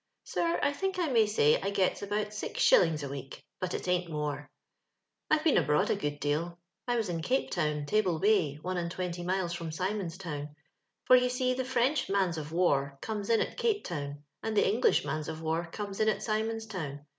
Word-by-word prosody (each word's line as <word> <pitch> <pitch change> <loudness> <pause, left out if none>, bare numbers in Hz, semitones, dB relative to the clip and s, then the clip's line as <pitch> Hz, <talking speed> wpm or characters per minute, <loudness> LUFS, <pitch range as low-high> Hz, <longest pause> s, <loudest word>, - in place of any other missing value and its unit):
Sir, 335 0 0
I 285 - +2
think 385 +5 -2
I 345 -4 +1
may 225 -4 +4
say 155 -8 +3
I 195 - -1
gets 195 -2 +1
about 210 +1 -2
six 210 - -5
shillings 160 -4 +5
a - - -3
week, 135 -1 -8 0.2
but 185 -1 -2
it - - -5
ain't 180 -1 +1
more. 150 -2 -3 0.4
'* - - -55
I've 310 0 +3
been 320 -4 +5
abroad 150 - +2
a - - +3
good 145 0 -3
deal. 160 +4 -1 0.3
I 245 - +1
was 225 -3 0
in 170 -2 -2
Cape 260 +10 0
Town, 150 -1 0
Table 185 0 +1
Bay, 190 -6 +3
one 185 0 -2
and 170 -1 -2
twenty 175 -1 -4
miles 180 -1 -1
fix)m 165 -2 -5
Simons' 185 +1 -2
Town— 150 -5 -6 0.5
for 255 - +8
you 250 0 +4
see 255 0 +1
the 260 +1 -1
French 260 +2 +1
mans 190 -4 +1
of 150 0 -7
war 140 -5 +1
come's 210 -2 -4
in 230 - +4
at - - -3
Cape 440 -3 +1
Town, 145 -4 -5 0.2
and 220 -1 -2
tho - - +6
English 220 +6 +3
mans 155 -1 -3
of 160 0 -5
war 165 +2 -1
comes 200 0 -5
in 215 0 +4
at - - -1
Simons' 220 0 -1
ToYTSi. 150 -9 -6
185 Hz, 215 wpm, -30 LUFS, 155-220 Hz, 0.5 s, for